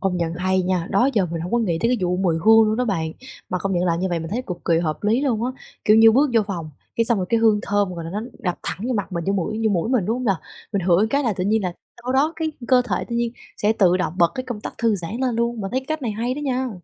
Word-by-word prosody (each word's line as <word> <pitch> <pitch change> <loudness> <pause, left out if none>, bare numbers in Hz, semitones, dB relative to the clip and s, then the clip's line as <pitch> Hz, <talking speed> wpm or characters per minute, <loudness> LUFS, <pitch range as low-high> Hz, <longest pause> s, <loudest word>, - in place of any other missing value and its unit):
công 190 -2 0
nhận 170 -1 -1
hay 185 +1 +1
nha, 180 -2 0
đó 225 +7 +3
giờ 205 -5 +2
mình 165 -1 -4
hông 175 +2 -5
có 240 - +3
nghĩ 180 -8 0
tới 230 - +2
cái 250 - +2
vụ 180 0 0
mùi 180 -3 +1
hương 225 0 +7
luôn 215 - 0
đó 250 - +1
bạn. 165 -8 -1 0.4
Mà 185 - -1
công 195 +1 -2
nhận 175 -1 +1
làm 170 -1 +1
như 190 - 0
vậy 175 -2 -1
mình 165 +1 -6
thấy 245 +4 -2
cực 180 -2 -4
kỳ 165 -1 +3
hợp 155 -3 -2
lý 225 +4 +3
luôn 240 -6 0
á. 250 - 0 0.3
Kiểu 215 - +6
như 225 0 +8
bước 275 +2 +3
vô 225 - +5
phòng, 170 -6 -5 0.3
cái 230 - +3
xong 230 -3 +1
rồi 185 - -2
cái 230 - +2
hương 220 -2 +4
thơm, 205 -2 0
gọi 170 -1 -6
là, 165 - -6
nó 205 - -3 0.2
đập 180 -7 -2
thẳng 215 +6 -4
vô 255 - +1
mặt 200 -3 -3
mình, 170 -2 -3
vô 195 - +2
mũi 205 +3 -2
vô 220 - +3
mũi 180 +3 0
mình, 245 -7 +2
đúng 225 - 0
hông 255 - -4
nà? 195 -5 +2 0.4
Mình 200 - +1
ngửi 175 -1 +4
một 210 +5 +3
cái 280 +1 +2
là 235 -5 +1
tự 180 - -1
nhiên 215 +1 +2
là 180 - -2 0.3
sau 250 +2 -2
đó 290 +4 +2
cái 320 -1 -2 0.2
cơ 255 -1 +5
thể 185 - -1
tự 235 - -4
nhiên 235 -1 0 0.2
sẽ 210 +1 +2
tự 185 -5 +3
động 180 -3 -1
bật 170 -1 +4
cái 255 - -4
công 245 -5 -5
tắc - - -6
thư 230 -2 +2
giãn 180 +4 -5
lên 255 -2 0
luôn. 235 0 -1
Mình 195 - -4
thấy 260 +4 0
cái 265 - -16
cách 310 -1 -3
này 235 - -1
hay 235 +4 -2
đó - - -6
nha. 260 -1 0
210 Hz, 330 wpm, -22 LUFS, 180-235 Hz, 0.4 s, như